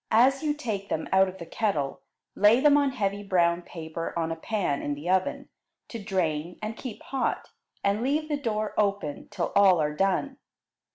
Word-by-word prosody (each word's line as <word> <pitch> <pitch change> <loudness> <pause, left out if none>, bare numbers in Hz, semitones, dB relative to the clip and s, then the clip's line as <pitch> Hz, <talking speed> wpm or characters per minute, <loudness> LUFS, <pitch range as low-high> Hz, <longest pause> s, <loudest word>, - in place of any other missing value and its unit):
As 260 +5 +4
you 300 -2 0
take 215 -9 -4
them 160 - -2
out 190 0 +5
of 185 0 -7
the 170 - -8
kettle, 165 -7 -1 0.3
lay 210 +4 +5
them 290 +1 +5
on 285 -1 +3
heavy 205 -6 -2
brown 175 -3 +2
paper 165 -1 -6
on 165 -1 -1
a - - -1
pan 170 -4 -1
in 145 - -2
the 145 +4 -8
oven, 185 0 0 0.4
to 230 -3 -7
drain 175 -4 -1
and 215 +1 -4
keep 235 -2 -8
hot, 270 -2 -2 0.3
and 200 +2 +1
leave 295 +5 0
the 300 - 0
door 215 -6 -2
open 200 -8 -1
till 190 -5 -3
all 190 -4 +6
are 150 -1 0
done. 195 - 0
200 Hz, 185 wpm, -27 LUFS, 170-230 Hz, 0.4 s, all